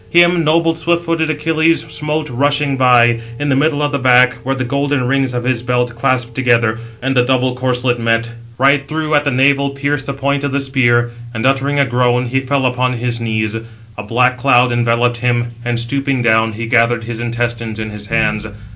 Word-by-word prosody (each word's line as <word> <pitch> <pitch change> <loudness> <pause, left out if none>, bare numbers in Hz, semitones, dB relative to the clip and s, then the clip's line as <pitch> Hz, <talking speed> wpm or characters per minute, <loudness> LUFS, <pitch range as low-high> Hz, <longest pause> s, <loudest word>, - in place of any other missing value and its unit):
Him 175 0 +4
noble 165 +2 +2
swift 170 +1 -1
footed 165 -1 -1
Achilles 160 +1 +1
smote 150 +1 -3
rushing 145 +2 0
by, 120 -2 +4 0.2
in 145 +2 -2
the 135 - +2
middle 150 +1 +1
of 145 - 0
the 140 - -1
back, 125 0 +4
where 135 +1 -1
the 130 - -3
golden 140 +1 -1
rings 135 -1 0
of 120 - -2
his 125 -2 -1
belt 125 0 -1
clasped 120 -1 -1
together, 120 -3 +1 0.2
and 135 0 -1
the 125 - +4
doubled 130 0 0
corslet 125 -1 0
met. 115 0 0 0.3
Right 140 +2 +2
through 155 0 -3
at 145 0 +2
the - - +2
navel 140 +1 +2
pierced 140 0 -3
the 140 - -2
point 140 +1 -1
of 140 - -2
the 140 - +1
spear, 120 -3 +1 0.2
and 110 +2 -2
uttering 135 +2 +1
a 140 - +3
groan, 125 0 +1
he 130 +2 -1
fell 135 0 -1
upon 125 0 0
his 120 -1 -3
knees; 110 -1 -2 0.4
a - - -6
black 125 +4 +1
cloud 125 -1 +3
enveloped 120 0 +1
him, 120 0 -1
and 120 -1 -1
stooping 135 +2 -1
down, 110 -1 +2
he 115 +2 -5
gathered 115 0 +2
his 115 0 -6
intestines 120 -1 -3
in 110 0 -5
his 105 0 -7
hands. 110 -1 -1
125 Hz, 200 wpm, -16 LUFS, 120-140 Hz, 0.4 s, Him